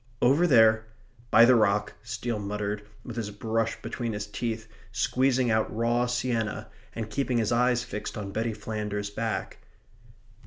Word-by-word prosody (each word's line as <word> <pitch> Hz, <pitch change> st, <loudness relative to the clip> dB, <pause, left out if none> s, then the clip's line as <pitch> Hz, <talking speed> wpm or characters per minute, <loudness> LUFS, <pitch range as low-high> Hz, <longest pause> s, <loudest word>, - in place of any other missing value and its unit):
"Over 140 Hz, +8 st, +4 dB
there 110 Hz, -5 st, +5 dB, 0.4 s
by 115 Hz, -, +8 dB
the 130 Hz, -, +6 dB
rock," 105 Hz, -2 st, +2 dB
Steele 120 Hz, -3 st, -3 dB
muttered, 105 Hz, +1 st, -3 dB, 0.2 s
with 120 Hz, -, -7 dB
his 110 Hz, -3 st, -2 dB
brush 115 Hz, +2 st, -2 dB
between 120 Hz, -3 st, -3 dB
his 105 Hz, 0 st, -3 dB
teeth, 110 Hz, +1 st, -4 dB, 0.2 s
squeezing 130 Hz, -2 st, +2 dB
out 110 Hz, 0 st, +1 dB
raw 120 Hz, +2 st, +1 dB
sienna, 120 Hz, -3 st, -2 dB, 0.2 s
and 115 Hz, -2 st, -3 dB
keeping 125 Hz, +2 st, -1 dB
his 115 Hz, -1 st, +1 dB
eyes 120 Hz, 0 st, +3 dB
fixed 105 Hz, +3 st, -6 dB
on 100 Hz, -2 st, -5 dB
Betty 110 Hz, +2 st, -1 dB
Flanders's 105 Hz, -1 st, -4 dB
back. 110 Hz, +1 st, -3 dB
115 Hz, 150 wpm, -27 LUFS, 105-120 Hz, 0.4 s, by